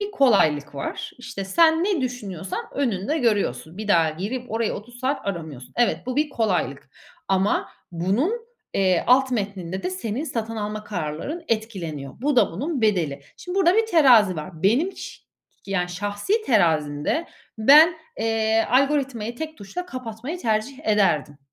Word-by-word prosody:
bir 410 0 -3
kolaylık 155 - +3
var. 140 - -5
İşte, 200 -5 -6
sen 320 - +4
ne 385 -6 +1
düşünüyorsan 205 -9 -4
önünde 255 - -1
görüyorsun. 190 - 0
Bir 215 -1 -5
daha 165 -5 +4
girip 225 +10 -5
orayı 225 -1 0
30 240 +4 -9
saat 265 -3 -1
aramıyorsun. 155 -9 -6
Evet, 240 -1 +2
bu 255 +1 -3
bir 300 0 +2
kolaylık. 160 - -1 0.4
Ama 195 +1 +1 0.2
bunun, 195 - +1 0.4
eee, 185 -3 +2
alt 260 +1 +5
metninde 195 -5 -3
de 180 - -2
senin 220 +9 -3
satın 225 -5 -4
alma 210 0 -4
kararların 180 - -4
etkileniyor. 175 - -3
Bu 290 -1 +1
da 240 - +4
bunun 275 - -3
bedeli. 175 -10 +1 0.2
Şimdi 360 +2 -6
burada 370 -1 +4
bir 450 - +3
terazi 245 - +5
var. 160 +1 -8
Benim 260 - +3
çi - - -10 0.4
yani 180 -2 -1
şahsi 205 - -1
terazimde 160 - +1 0.3
ben, 300 +9 +7 0.3
eee, 225 0 +1
algoritmayı 260 -4 +1
tek 315 +2 -6
tuşla 280 - -6
kapatmayı 255 +2 -6
tercih 225 +2 -1
ederdim 165 -10 +2
215 Hz, 150 wpm, -23 LUFS, 180-270 Hz, 0.4 s, ben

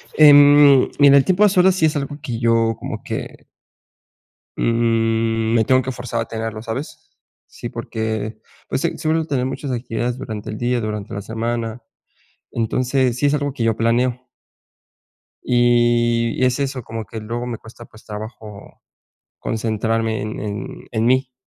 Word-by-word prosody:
Em, 145 -2 +7
mira, 140 0 +7
el 135 - +4
tiempo 190 +3 +3
a 210 - +6
solas 185 -1 +4
sí, 160 - +2
es 155 - +1
algo 145 0 -3
que 120 -5 -4
yo, 115 -1 +2
como - - -6
que - - -6 1.1
mm, 115 -1 +1
me 115 -1 +4
tengo 130 0 +4
que 130 - -3
forzar 120 -2 -4
a - - -3
tenerlo, 110 -1 -5
¿sabes? 120 +6 -7 0.4
Sí, - - -8
porque 110 0 -4 0.3
pues 135 - -2
si, 170 - -1
suelo 160 0 0
tener 130 -5 -1
muchas 135 +1 -4
actividades 120 0 -3
durante 110 -5 -6
el 105 - -5
día, 120 0 0
durante 105 -2 -5
la 100 - -4
semana. 115 +2 -3 0.7
Entonces 125 +2 0
sí, 145 - 0
es 140 - +2
algo 145 -2 -1
que 120 - -3
yo 115 -1 +2
planeo. 125 +2 0 1.2
Y 120 -1 +2
es 125 +2 +2
eso 135 -3 -2
como 110 -1 -6
que 110 +3 -7
luego 120 +3 -4
me 120 -2 -4
cuesta, 115 +1 -13
pues, 110 - -18
trabajo 105 -1 -9 0.6
concentrarme 110 0 -1
en 110 +1 -5
en 105 -2 -6
en 115 0 0
mí, 130 0 +2
120 Hz, 160 wpm, -20 LUFS, 110-130 Hz, 1.2 s, Em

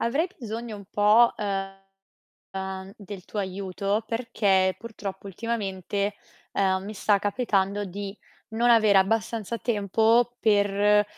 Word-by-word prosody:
Avrei 275 +9 +1
bisogno 230 -2 -5
un 200 - -11
po', 215 +3 +5
uhm, 195 -1 -5 0.9
del 200 -2 -9
tuo 215 - -7
aiuto 195 +2 -2
perché 200 -6 +1
purtroppo 200 -4 -7
ultimamente, 200 -1 -3 0.4
uhm, 190 -1 +1
mi 210 +2 -6
sta 205 0 +2
capitando 205 -1 0
di 200 +1 -6 0.3
non 235 +2 +2
aver 215 -3 +5
abbastanza 220 +2 +1
tempo 225 +2 +2
per, 205 -1 +3
205 Hz, 115 wpm, -26 LUFS, 195-225 Hz, 0.9 s, po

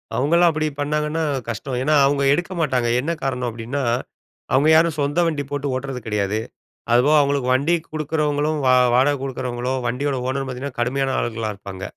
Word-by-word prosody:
அவுங்கல்லாம் 170 +5 +3
அப்படி 155 0 -1
பண்ணாங்கன்னா 150 +2 -1 0.3
கஷ்டம். 125 +4 -4
ஏன்னா, 150 +3 +2
அவுங்க 140 0 +1
எடுக்க 175 +4 -2
மாட்டாங்க. 130 -5 +1
என்ன 160 +6 -2
காரணம் 125 -2 -1
அப்படீன்னா, 120 +5 -4 0.7
அவுங்க 140 +4 +4
யாரும் 160 -1 +3
சொந்த 145 +4 0
வண்டி 150 -3 -1
போட்டு 145 0 -2
ஓட்டுறது 130 -1 -4
கிடையாது. 105 0 -1 0.5
அதுபோவ 140 +6 +4
அவுங்களுக்கு 140 -2 0
வண்டி 140 +7 +2 0.2
குடுக்குறவங்களும், 150 0 -1
வா 130 - +5 0.2
வாடகை 140 +3 +3
குடுக்குறவங்களும், 130 -1 -3
வண்டியோட 135 +4 -1
ஓனரும் 135 +1 -2
பார்த்தீங்கன்னா 130 +1 -6
கடுமையான 135 +2 0
ஆள்களா 115 -2 -2
இருப்பாங்க. 95 -1 -9
140 Hz, 155 wpm, -21 LUFS, 125-150 Hz, 0.7 s, வா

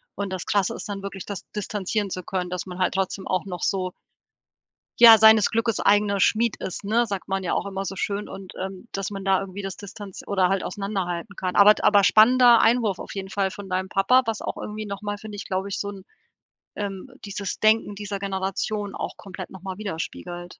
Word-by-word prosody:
Und 200 -2 -4
das 185 - -4
Krasse 200 -2 +1
ist - - -7
dann 200 -1 -5
wirklich 195 -2 -6
das 200 -4 -6
distanzieren 205 0 -2
zu 185 -1 -5
können, 180 -1 -3
dass 180 +1 -4
man 180 0 -8
halt 185 - +1
trotzdem 195 0 -2
auch 185 +1 0
noch 180 -3 -6
so 185 -2 0 1.1
ja, 230 -2 +10
„seines 220 -1 +7
Glückes 230 0 0
eigener 200 -1 +3
Schmied 230 +2 +2
ist“, 190 - -6
ne? 225 +4 +2
Sagt 200 -4 -5
man 195 0 -1
ja 180 - -2
auch - - -1
immer 195 0 -4
so 195 - -5
schön 205 +1 -3
und, 195 -1 -9
ähm, 190 +4 -6
dass 195 +1 -3
man 195 -1 -6
da 190 0 +3
irgendwie 195 +1 -7
das 195 -1 -5
Distanz 205 -1 -9
oder 190 -3 +2
halt 195 -1 0
auseinanderhalten 195 -1 -4
kann. 185 -1 -3
Aber 210 +1 +8
d - - -8
aber 205 -1 +5
spannender 240 +3 +6
Einwurf 225 -5 +3
auf - - -8
jeden 190 -1 -5
Fall 195 -1 -1
von 200 0 -9
deinem 185 +1 -2
Papa, 250 +7 +4
was 225 -2 -2
auch - - -4
irgendwie 215 0 -6
noch 200 +1 -6
mal, 205 0 -3
finde 210 -1 -8
ich, 200 - -6
glaube 190 +1 -2
ich, 200 - -3
so 200 - -3
'n 195 -2 -11 0.7
ähm, 200 +2 -5 0.2
dieses 200 -1 -4
Denken 215 -1 +3
dieser 200 -1 -5
Generation 195 +1 -3
auch - - -5
komplett 190 -1 -8
noch 190 -1 -12
mal 190 -1 -5
widerspiegelt. 175 -2 -5
195 Hz, 220 wpm, -24 LUFS, 190-210 Hz, 1.1 s, ja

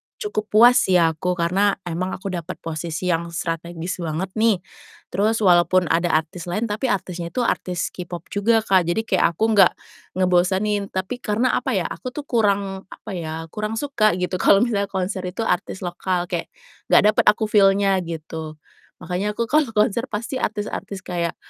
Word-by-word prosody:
cukup 415 - -4
puas 240 +4 +6
ya 175 -3 +4
aku, 180 +3 -2
karena 190 +4 +2
emang 180 +2 -3
aku 190 0 -6
dapat 175 0 -5
posisi 165 +2 -3
yang 170 0 -1
strategis 170 +1 -4
banget 170 +3 -3
nih, 225 -3 +4 0.5
terus 215 +4 +1
walaupun 175 -1 +4
ada 170 +1 +2
artis 165 +3 -2
lain 210 +6 -2
tapi 235 +5 -1
artisnya 180 -4 -2
itu 250 - +1
artis 180 -6 -1
K-pop 175 -1 -7
juga 220 +2 +2
Kak, 185 -5 +3
jadi 220 +6 0
kayak 185 -5 +1
aku - - -2
nggak 195 -3 +6 0.4
ngebosenin, 190 +3 +1
tapi 190 +7 -4
karena 225 +4 +1
apa - - -2
ya, - - +1
aku 255 +1 -7
tuh 295 - -4
kurang 200 -6 0
apa 215 - -10
ya, 165 -3 -4
kurang 215 +1 -3
suka 220 -7 +1
gitu 180 0 -2
kalau 200 +5 +5
misalnya 200 -4 0
konser 190 0 -2
itu 185 +5 -3
artis 190 -1 -2
lokal, 180 0 -2
kayak 170 - -2 0.4
gak - - +5
dapet - - +1
aku 210 +1 +4
feel-nya 195 -1 +4
gitu. 160 -2 -6 0.5
Makanya 190 +5 -2
aku 230 0 -2
kalau 305 -2 +4
konser 215 +3 +2
pasti 235 +4 -4
artis-artis 210 -3 -4
kayak 170 -2 -2
190 Hz, 170 wpm, -22 LUFS, 175-210 Hz, 0.5 s, puas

